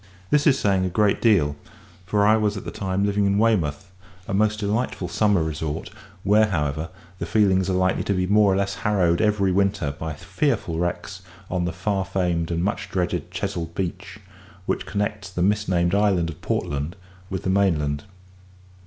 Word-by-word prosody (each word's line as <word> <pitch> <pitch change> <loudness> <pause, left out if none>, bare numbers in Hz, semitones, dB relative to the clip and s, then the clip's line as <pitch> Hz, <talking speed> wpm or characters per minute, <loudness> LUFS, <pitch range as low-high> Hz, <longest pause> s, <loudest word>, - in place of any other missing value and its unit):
This 150 0 +4
is 135 -2 +5
saying 95 -5 +2
a 95 - 0
great 100 +3 +2
deal, 85 -11 +3 0.5
for 100 +2 +2
I 110 +1 +6
was 105 -2 0
at - - -7
the - - -5
time 95 0 -1
living 100 0 +1
in 100 0 +2
Weymouth, 100 -6 +1 0.4
a - - -3
most 105 +2 +2
delightful 105 -2 -1
summer 100 0 +2
resort, 80 0 -4 0.3
where, 105 +2 +4
however, 80 -3 -2 0.3
the - - -3
feelings 95 -3 +3
are - - +1
likely 95 0 +1
to 100 - +1
be 90 0 +1
more 100 +1 +4
or - - +2
less 100 0 0
harrowed 90 -5 +2
every 105 -3 +2
winter 100 -5 +1
by 80 +2 -5
fearful 100 - -1
wrecks 90 +2 -3 0.3
on 90 -1 0
the 85 - -1
far 95 +3 -1
famed 90 -3 -1
and 85 0 -1
much 100 - -2
dreaded 90 -2 -2
Chesil 85 -1 -3
Beach, 90 -2 -4 0.5
which - - -2
connects 105 -1 -2
the 90 -1 -2
mis 105 +2 +1
named 85 -1 +1
island 100 -5 +2
of 75 - -14
Portland 70 +5 -2 0.3
with 95 -2 -4
the 95 - 0
mainland. 75 -7 +1
95 Hz, 180 wpm, -23 LUFS, 85-105 Hz, 0.5 s, I